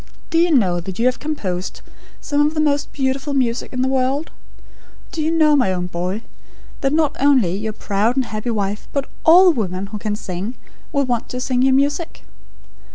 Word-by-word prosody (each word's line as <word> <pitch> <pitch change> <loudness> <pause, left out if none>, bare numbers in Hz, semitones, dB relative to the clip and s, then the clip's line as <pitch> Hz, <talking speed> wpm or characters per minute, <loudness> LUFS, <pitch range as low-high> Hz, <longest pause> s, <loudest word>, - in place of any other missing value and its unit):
Do 330 - +3
you 345 +1 +4
know 190 - +3
that 180 +2 -7
you 230 - +1
have 255 0 +2
composed 195 -13 -4 0.4
some 290 -1 0
of 300 +2 0
the - - 0
most 290 -1 +1
beautiful 270 +1 -1
music 245 -2 0
in 255 0 -1
the - - +1
world? 265 +3 0 0.8
Do 320 - -3
you 310 - +1
know, 310 -2 +4
my 250 -9 +3
own 180 -1 -2
boy, 180 +5 -3 0.6
that 270 - +1
not 305 -1 +1
only 260 -11 +3
your 215 +2 -3
proud 210 +3 0
and 265 -2 +1
happy 215 +2 -4
wife, 205 -2 -2
but 280 -1 -1 0.2
ALL 355 +2 +8
women 190 - -2
who 210 - -3
can 210 0 -2
sing, 195 +4 -5 0.4
will 280 -1 +1
want 240 -3 -2
to 250 - -4
sing 250 -1 0
your 265 0 +4
music? 285 +4 -1
255 Hz, 195 wpm, -20 LUFS, 205-290 Hz, 0.8 s, ALL